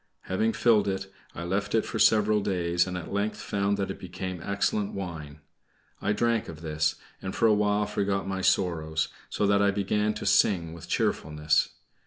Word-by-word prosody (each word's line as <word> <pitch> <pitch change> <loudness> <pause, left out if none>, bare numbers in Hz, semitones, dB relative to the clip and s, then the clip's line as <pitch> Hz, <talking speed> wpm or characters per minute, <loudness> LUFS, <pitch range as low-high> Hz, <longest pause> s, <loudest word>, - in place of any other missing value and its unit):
Having 110 +4 0
filled 110 -4 +3
it, 95 0 -3 0.2
I 85 - -5
left 100 +5 -1
it 110 - +2
for - - -4
several 105 -1 +4
days, 85 -2 +1
and 90 -1 -3
at 90 - -7
length 105 +1 -1
found 100 -1 0
that 95 -1 -2
it - - -8
became 90 -1 -6
excellent 100 +1 -1
wine. 80 -6 -6 0.6
I 105 - +1
drank 115 +1 +1
of 80 -1 -9
this, 80 -1 0 0.3
and 95 - -5
for - - +2
a 110 - +6
while 105 0 +2
forgot 100 -1 -1
my 95 0 -2
sorrows, 80 -4 +1 0.2
so 105 - 0
that 100 0 +3
I 100 - +4
began 105 +2 0
to - - -5
sing 85 -5 +3
with 85 - -11
cheerfulness. 75 0 +1
95 Hz, 185 wpm, -27 LUFS, 85-105 Hz, 0.6 s, a